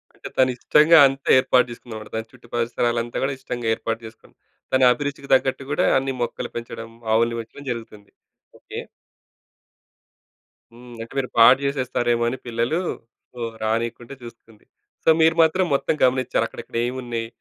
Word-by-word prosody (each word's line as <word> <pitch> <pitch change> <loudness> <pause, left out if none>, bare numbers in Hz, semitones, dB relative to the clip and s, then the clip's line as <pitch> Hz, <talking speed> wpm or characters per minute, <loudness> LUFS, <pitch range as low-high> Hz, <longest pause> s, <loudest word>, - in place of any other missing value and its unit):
అంటే - - -9
తను 130 -1 +4
ఇష్టంగా 155 +6 +5
అంతే, 135 +1 -5
ఏర్పాటు 130 -1 +3
చేసుకుందనమాట. 110 -2 -9
తన 110 - -2
చుట్టూ 125 -2 -18
పరిసరాలంతా 120 0 -1
కూడా, 135 +1 0
ఇష్టంగా 120 -3 -5
ఏర్పాటు 115 0 -4
చేసుకుంది. 110 - -15 0.4
తన 130 - +3
అభిరుచికి 140 +1 -5
తగ్గట్టు 130 +1 0
కూడా, - - +2
అన్ని 135 0 -3
మొక్కలు 120 - -3
పెంచడం, 115 -1 -7 0.2
ఆవుల్ని 115 +1 +2
పెంచడం 140 +5 -13
జరుగుతుంది. 110 -3 -9 0.5
ఓకే. - - -8 1.9
హ్మ్. 120 0 -13
అంటే 115 - -9
మీరు 130 -2 -1
పాడు 125 +4 +8
చేసేస్తారేమో 125 -3 0
అని 130 - -4
పిల్లలు, 120 +8 -1 0.5
సో, 125 - -12 0.2
రానీయకుంటే 115 +3 -2
చూస్తుంది. 115 -2 -14 0.4
సో, - - +3
మీరు 160 0 +4
మాత్రం, 185 +4 +2
మొత్తం 140 +3 0
గమనించారు. 130 0 +2
అక్కడక్కడ - - -8
ఏమున్నాయి? 120 -2 -4
120 Hz, 140 wpm, -22 LUFS, 115-135 Hz, 1.9 s, పాడు